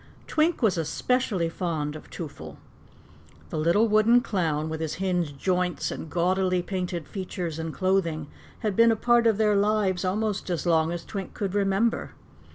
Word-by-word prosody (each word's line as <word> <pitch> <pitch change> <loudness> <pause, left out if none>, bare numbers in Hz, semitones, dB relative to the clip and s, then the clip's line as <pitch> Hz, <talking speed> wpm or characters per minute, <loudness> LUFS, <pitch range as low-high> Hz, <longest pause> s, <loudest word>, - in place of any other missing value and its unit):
Twink 315 -2 +1
was 195 -6 +3
especially 195 - 0
fond 160 -3 -3
of 155 - -11
Twoffle. 80 - -8 0.9
The 155 - -2
little 170 +8 +3
wooden 220 +3 +5
clown, 160 -8 -1
with 160 0 -4
his 160 -2 -2
hinged 175 -6 -1
joints 180 +2 0
and 160 - -6
gaudily 180 +2 +1
painted 180 -4 -3
features 180 -4 -5
and 160 0 -3
clothing, 175 -4 0 0.4
had 210 -4 -1
been 230 +2 +6
a - - +2
part 235 +1 +3
of 220 -3 +3
their 210 -1 +3
lives 200 -3 +1
almost 205 +1 -1
as 175 -1 -2
long 165 -1 +3
as 170 -1 -5
Twink 195 -3 -6
could 195 -2 -3
remember. 205 +3 +1
185 Hz, 165 wpm, -26 LUFS, 165-210 Hz, 0.9 s, been